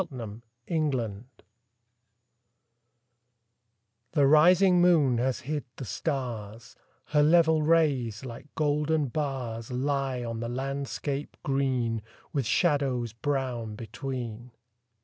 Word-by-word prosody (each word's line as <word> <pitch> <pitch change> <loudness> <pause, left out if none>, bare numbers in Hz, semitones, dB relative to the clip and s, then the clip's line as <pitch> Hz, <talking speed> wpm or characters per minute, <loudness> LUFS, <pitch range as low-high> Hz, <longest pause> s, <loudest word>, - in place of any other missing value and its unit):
ENDYMION 130 - -1 2.9
The 145 -3 +4
rising 175 +5 +6
moon 150 -9 +4
has 130 +1 0
hid 150 +2 -3
the 130 - -6
stars; 115 -7 -4 0.3
Her 150 - +4
level 160 0 +5
rays, 140 -8 +2
like 125 +3 -8
golden 150 -1 +1
bars, 125 -5 -3
Lie 135 0 -1
on 115 -1 -4
the 115 0 -3
landscape 135 +2 -3
green, 130 -5 0 0.3
With 135 -6 0
shadows 130 -6 +1
brown 120 -4 -2
between. 120 +1 -6
135 Hz, 90 wpm, -28 LUFS, 120-150 Hz, 2.9 s, rising